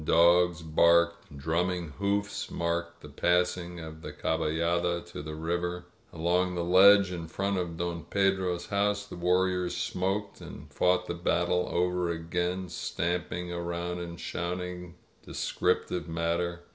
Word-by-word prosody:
Dogs 85 +1 +4
barked. 85 0 +3
Drumming 85 +3 -1
hoofs 100 0 -1
marked 85 0 -2
the - - -10
passing 90 +3 0
of 80 -1 -7
•^ 80 - -15
the - - -7
cabaUada 85 +2 0
to - - -6
the 75 +1 -6
river. 85 +2 -2 0.3
Along 90 +2 +1
the 85 - -1
ledge 95 +2 +7
in 85 -2 -5
front 95 +4 -1
of 85 -2 -4
Don 85 -1 -3
Pedro's 95 -3 +1
house 100 0 0
the - - -9
warriors 90 0 +1
smoked 100 +3 -2
and - - -10
fought 90 0 +2
the 85 - -3
battle 85 +1 0
over 90 0 +1
again, 90 +2 -2
stamping 85 0 -3
around 85 0 -3
and 85 -1 -7
shouting 90 0 -4 0.3
descriptive 90 -1 -1
matter. 85 +1 -1
85 Hz, 135 wpm, -29 LUFS, 85-90 Hz, 0.3 s, ledge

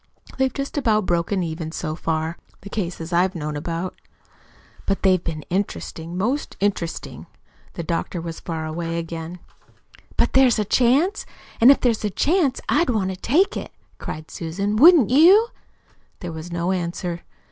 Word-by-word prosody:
They've 265 0 +2
just 275 +3 -3
about 215 -6 +2
broken 175 +2 0
even 160 -1 -4
so 155 -2 -4
far 160 0 -2 0.2
the 200 - -10
cases 175 -4 -4
I've 180 +2 +2
known 150 -2 -4
about. 165 +4 -4 0.9
But 195 - -1
they've 185 -3 +3
been 155 -2 -4
interesting, 175 -3 -3
most 245 +10 -2
interesting." 190 -5 -3 0.5
The 170 - -5
doctor 170 +2 -2
was 165 -1 -6
far 160 -2 -4
away 165 +1 -3
again. 165 +1 -5 0.8
"But - - +2
there's 265 -3 +5
a 210 - 0
chance; 275 - +2 0.3
and 235 - +9
if 280 - +6
there 245 - +4
is 220 - -4
a 210 - +1
chance 295 - +1
I'd 340 - +2
want 200 -5 0
to - - -5
take 300 - +2
it," - - -5 0.3
cried 155 +1 -7
Susan. 195 +5 -3
"Wouldn't 295 - +7
you?" 375 - +6 0.7
There 175 -3 -5
was 160 +2 -8
no 170 +1 -1
answer. 175 -1 -3
185 Hz, 160 wpm, -22 LUFS, 165-235 Hz, 0.9 s, and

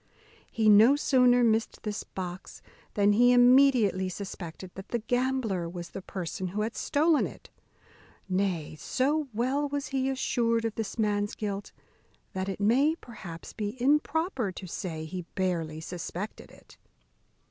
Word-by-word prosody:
He 220 -1 +1
no 215 +6 +7
sooner 250 -4 +4
missed 225 -1 +1
this 210 -1 -3
box 180 -1 -7 0.3
than 205 0 +4
he 245 +3 +5
immediately 245 -7 +5
suspected 185 -2 -7
that 195 +1 -9
the 240 - 0
gambler 235 -6 -1
was 175 -1 -7
the 195 - -7
person 185 0 -5
who 200 +4 -3
had 220 +2 -2
stolen 310 +2 +2
it; - - -14 0.8
nay, 185 -5 -1
so 290 +3 0
well 260 +6 0
was 285 0 -3
he 265 -1 0
assured 230 -3 0
of 225 - -1
this 220 -1 -5
man's 205 -2 0
guilt, 205 -2 -4 0.6
that 190 +1 -3
it 195 - -4
may, 260 +10 +3
perhaps, 195 - -10
be 215 +3 -4
improper 290 - +1
to 185 - -9
say 165 -3 -5
he 180 +3 -5
barely 170 -5 -1
suspected 180 +4 -6
it. - - -18
215 Hz, 145 wpm, -28 LUFS, 185-255 Hz, 0.8 s, no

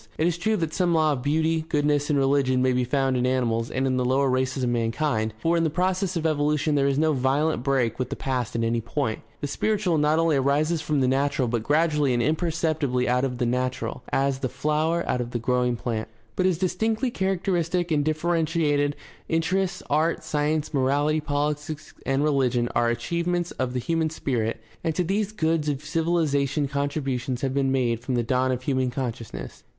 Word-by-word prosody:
It 160 - +1
is 175 0 0
true 215 +5 +1
that 165 -3 -2
some 175 -2 +2
law 155 -1 +3
of 130 - -4
beauty, 160 +3 +1
goodness, 145 0 +1
and 150 - +2
religion 135 -1 +2
may 130 0 +3
be 125 0 +1
found 135 +1 +1
in 125 0 +1
animals 115 -3 0
and 130 +1 -1
in 130 -1 +1
the 125 - +1
lower 130 +2 +2
races 130 +1 0
of 125 - +1
mankind, 115 0 0
for 165 +8 +1
in 165 - +2
the 160 - +2
process 185 +3 0
of 165 -1 -2
evolution 150 0 +1
there 140 -1 +3
is 140 -1 +1
no 155 +1 +3
violent 135 +2 +1
break 130 -3 0
with 130 - -2
the - - -3
past 125 -4 -2
at 115 - 0
any 115 0 0
point. 115 -1 -2 0.2
The - - -2
spiritual 195 0 0
not 150 +1 +3
only 165 -3 +3
arises 150 +4 +1
after 150 -1 -1
the 130 -2 +2
natural 135 0 +1
but 115 -1 -1
gradually 150 0 +2
and 120 - +1
imperceptibly 155 -5 0
out 125 +1 +2
of 125 -2 -1
the 125 - 0
natural, 125 +1 -2
as 135 0 +1
the 130 - -2
flower 155 +5 0
out 125 - 0
of 120 - -4
the 120 - -2
growing 125 +1 +1
plant. 115 -2 -3 0.3
But 185 - +2
as 180 -3 +1
dis 185 +1 -1
tinctly 225 +4 0
characteristic 180 -2 0
and 150 -2 +2
differentiated 155 -2 +1 0.3
interests, 180 +3 0
art, 155 +3 +1
science, 155 0 -1
morality, 145 +3 +2
politics, 150 +1 -3
and 135 +1 +2
rehgion 130 -5 +1
are 120 0 +2
achievements 170 +8 -1
of 130 -1 -3
the 125 - -1
human 160 +5 0
spirit, 120 -7 -2 0.2
and 160 -1 -1
to 180 - +1
these 200 +4 -1
goods 160 -6 0
of 145 +1 -3
civilization 150 -3 +1
contributions 135 -3 -2
have 135 -1 -1
been 135 -1 +1
made 120 -4 +1
from 120 +2 -3
the 120 - +1
dawn 130 +2 +1
of 125 0 -3
human 130 -2 0
consciousness. 115 - -6
145 Hz, 200 wpm, -25 LUFS, 130-160 Hz, 0.3 s, law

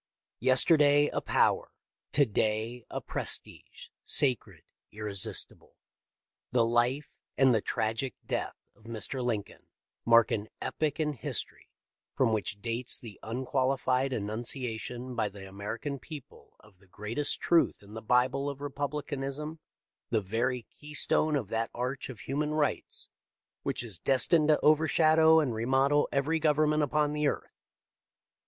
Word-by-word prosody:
Yesterday 145 +3 +5
a - - -2
power: - - +2 0.4
to 145 - +5
day 110 +2 -1
a - - -4
prestige, - - -3
sacred, 130 -6 +1 0.3
irresistible. 105 -2 -1 0.8
The 120 -2 +3
life 120 +5 0 0.2
and 130 -2 +5
the 110 - +2
tragic 110 +6 -2
death - - -3 0.2
of 110 - -24
Mr. 115 +3 -1
Lincoln 110 -5 -4 0.4
mark 115 -1 +5
an 105 0 -2
epoch 155 0 -2
in 150 -1 0
history 130 - -5 0.5
from 120 -4 +2
which 105 -1 -2
dates 120 +1 -1
the 110 -5 -11
unqualified 130 +2 0
annunciation 120 +2 -4
by 110 -3 0
the 100 -1 -10
Amercan 110 +8 -5
people 145 +1 -12
of 105 -3 -20
the 95 - -18
great 105 +7 -6
est 145 - +3
truth 170 -10 +2
in 100 +1 -14
the 110 - -6
bible 125 +4 +1
of 140 -1 -7
republicanism 145 +1 -4 0.2
— - - -63
the 115 - +2
very 115 +5 -1
keystone 150 +3 0
of 120 -9 -2
that 115 +1 -1
arch 125 +3 -3
of 115 -7 -9
human 150 +5 -2
rights 150 -3 0 0.5
which - - -2
is 105 -8 -5
des 135 -1 +3
tined 160 -3 +4
to 155 -1 +4
overshadow 160 +1 +5
and 140 -6 0
remodel 135 +6 +2
every 145 +4 +1
government 150 0 +2
upon 150 +1 +1
the 150 0 +1
earth. - - -3
130 Hz, 140 wpm, -29 LUFS, 115-145 Hz, 0.8 s, Yesterday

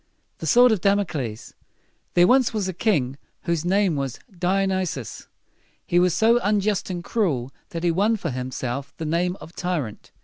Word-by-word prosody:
THE - - -4
SWORD 245 0 +6
OF 210 -5 +1
DAMOCLES. 170 - -1 0.6
There 175 - +7
was 255 +4 +4
once 205 -3 0
a 185 - -3
king 145 - 0 0.2
whose 170 -3 -1
name 190 -1 +2
was 135 -3 -3 0.2
Di 185 +3 +1
o - - +2
nys´i 185 -5 -1
us. 120 -5 -8 0.6
He 175 - +2
was 180 -1 +3
so 230 +5 +4
unjust 205 -2 +1
and 175 -2 -4
cruel 145 - -1 0.2
that 165 0 -5
he 175 - +3
won 205 +7 +2
for 190 - -3
himself 130 +1 -4
the 160 - -4
name 175 +3 0
of 165 - -12
tyrant. 160 - -3
175 Hz, 180 wpm, -24 LUFS, 145-200 Hz, 0.6 s, There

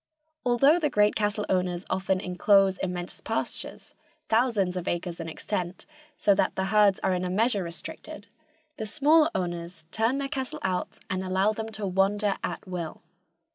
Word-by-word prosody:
Although 275 +7 +4
the 300 -3 +1
great 210 -4 +3
cattle 210 0 0
owners 180 -1 0
often 190 0 0
inclose 190 +1 +3
immense 180 -1 -4
pastures, - - -3 0.4
thousands 220 -6 +2
of 180 -1 -4
acres 175 0 -2
in 165 -1 -5
extent, 180 +2 -4 0.3
so 205 - +4
that 195 - +1
the 190 - 0
herds 205 -2 +5
are 190 - +2
in 180 0 -1
a 180 - -1
measure 210 +2 +2
restricted, 170 0 -8 0.5
the 220 - -4
smaller 310 +5 +4
owners 175 -2 -4
turn 225 +4 +1
their 280 0 -2
cattle 265 -3 -4
out 185 -1 -2
and 185 0 -1
allow 190 +3 +2
them 220 +1 -5
to 215 -1 -4
wander 195 +2 +1
at - - -4
will. 175 -3 -5
195 Hz, 165 wpm, -27 LUFS, 180-220 Hz, 0.5 s, herds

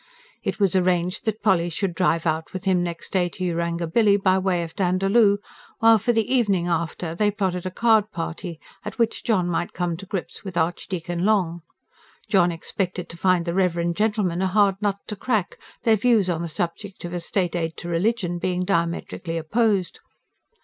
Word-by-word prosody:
It - - -3
was 195 -3 +2
arranged 180 +3 +1
that 220 0 -2
Polly 175 -5 +3
should 175 +2 -2
drive 165 -1 +1
out 160 0 -1
with 185 0 -6
him 185 -2 +3
next 170 -1 -4
day 180 -2 +2
to 185 - -7
Yarangobilly, 170 +4 +2
by 190 -1 +3
way 185 -2 0
of 165 -1 -8
Dandaloo; 195 +3 +3 0.4
while 225 -1 +6
for 240 - +1
the 225 -2 +1
evening 200 -9 +2
after 170 0 -2
they 210 +5 +2
plotted 185 -3 -2
a - - -1
card 215 +1 +3
party, 165 -1 -5 0.2
at 210 - -7
which 230 -2 0
John 190 -6 +1
might 175 0 -2
come 175 -2 -1
to 195 +2 -10
grips 190 -2 -5
with 190 -3 -6
Archdeacon 175 0 -2
Long. 185 -5 +1 0.7
John 190 -5 +3
expected 180 +2 -3
to - - -8
find 180 -1 +2
the 170 - -2
reverend 170 -2 +1
gentleman 210 -4 0
a 190 - +2
hard 200 0 +2
nut 205 -1 0
to 210 - -5
crack, 215 -3 -1 0.2
their 225 -2 +4
views 210 -4 +3
on 165 -1 -2
the 170 - -3
subject 175 +4 -4
of 175 - -6
a 175 - -2
state 180 +1 -1
aid 165 -2 -2
to 170 - -7
religion 175 0 0
being 180 0 -1
diametrically 170 -1 -1
opposed. 200 +2 0
185 Hz, 185 wpm, -23 LUFS, 170-205 Hz, 0.7 s, while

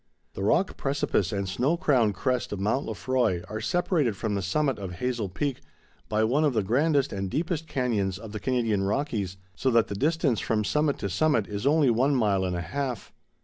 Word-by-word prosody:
The - - -6
rock 180 - +2
precipice 135 -9 0
and 100 -1 -2
snow 125 - +1
crowned 130 - +2
crest 125 +5 -1
of 105 - -3
Mount 105 +7 0
Lefroy 110 -5 0
are 110 0 -5
separated 145 - +1
from 110 -3 -2
the 100 - -1
summit 135 +7 0
of 95 -3 -5
Hazel 120 0 -2
Peak 135 +7 -3 0.5
by 110 0 +2
one 130 +8 +2
of 145 -3 +2
the 110 - +2
grandest 140 +6 +2
and 95 -1 -3
deepest 160 - -2
canyons 115 - -1
of 110 +1 -9
the 105 - -5
Canadian 115 -6 0
Rockies, 100 -3 -1 0.2
so 130 - 0
that 115 -3 +3
the - - -3
distance 145 - +1
from 110 -1 0
summit 150 +6 +1
to - - -3
summit 130 - +2
is 105 +5 -3
only 145 -3 +4
one 130 +5 +2
mile 100 -6 +2
and 90 -1 -2
a 85 - -2
half. 125 +5 -4
115 Hz, 200 wpm, -27 LUFS, 100-140 Hz, 0.5 s, only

